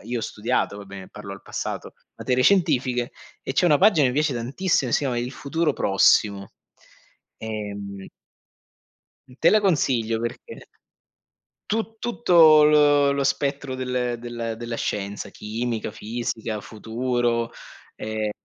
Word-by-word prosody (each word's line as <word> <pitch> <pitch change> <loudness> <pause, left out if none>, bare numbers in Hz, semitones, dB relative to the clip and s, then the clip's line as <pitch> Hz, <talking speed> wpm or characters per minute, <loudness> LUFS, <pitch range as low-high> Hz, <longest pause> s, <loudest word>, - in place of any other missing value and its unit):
io 120 +2 -3
ho - - -5
studiato, 110 -1 -1
vabbè, 100 -2 -10
parlo 105 -2 -9
al 100 - -11
passato, - - -5 0.2
materie 125 0 0
scientifiche, 130 -10 +2 0.3
e - - -3
c'è 180 - +2
una 150 -4 +5
pagina 185 -9 +5
e - - +2
mi 125 - -3
piace 150 -1 +1
tantissimo 130 +3 0
e - - +2
si - - +1
a 130 -3 -1
"Il 120 +2 -3
futuro 150 +3 -1
prossimo". 100 -2 +2 0.9
Ehm 100 -3 -6 1.2
Mh, 125 - -16
te 165 - +5
la 215 - +5
consiglio 125 - +1
perché 120 0 -6 1.1
tu 225 +1 -2
tutto 170 -10 +5
lo 145 -1 +5
lo 140 0 0
spettro 140 0 -1
del 125 -2 -2
del 115 -1 -5
della 120 0 -5
scienza, 100 -2 -4
chimica, 110 +2 -4
fisica, 115 -1 -4
futuro 115 +2 -2 0.4
ehm, 110 -1 -3
120 Hz, 135 wpm, -24 LUFS, 110-145 Hz, 1.2 s, una